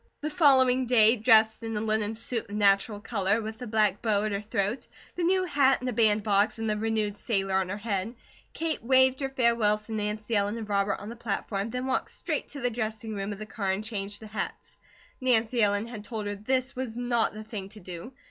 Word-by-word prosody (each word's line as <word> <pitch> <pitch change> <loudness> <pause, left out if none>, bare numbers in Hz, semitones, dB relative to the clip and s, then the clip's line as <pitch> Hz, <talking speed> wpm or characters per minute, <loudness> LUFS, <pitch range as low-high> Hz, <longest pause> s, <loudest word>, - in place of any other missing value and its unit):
The 305 +1 -3
following 260 -5 +4
day, 225 -1 +6
dressed 220 -1 +4
in 225 -1 -4
a - - 0
linen 215 0 -1
suit 230 -1 -4
of 205 - -6
natural 205 +1 +2
colour, 205 -1 0
with 220 0 -6
the 250 - -6
black 210 -2 +1
bow 210 -3 +1
at 215 - -1
her 200 0 -2
throat, 210 +2 -2 0.3
the 355 - -3
new 370 +2 +2
hat 280 -6 +3
in 255 - -5
a 250 - -1
bandbox, 210 -1 +2
and 225 0 -3
the 215 - +1
renewed 215 -1 -1
sailor 195 -5 -1
on 190 -1 +1
her 200 - -3
head, 205 +1 -3 0.4
Kate 325 -7 -3
waved 260 +1 +4
her 270 -1 -2
farewells 235 -5 +1
to 225 - -11
Nancy 215 +1 -2
Ellen 205 +2 +1
and 220 -2 -6
Robert 200 -1 0
on 205 - -8
the 235 - -7
platform, 205 -2 -3
then 250 +2 -3
walked 260 -1 -1
straight - - -3
to 280 - -8
the 245 0 0
dressing 220 -1 -4
room 200 0 -4
of 205 - -5
the 215 - -7
car, 210 -2 -4
and 190 +2 -1
changed 205 -1 -5
the - - -8
hats. 215 0 -6 0.4
Nancy 235 -2 +2
Ellen 205 0 +2
had 230 -3 -8
told 215 -1 -5
her 205 - -2
this 255 +6 -1
was 250 -3 -5
NOT 240 -2 +1
the 215 - -7
thing 210 -3 -7
to 215 +1 -12
do. 180 +4 -8
220 Hz, 225 wpm, -27 LUFS, 205-240 Hz, 0.4 s, day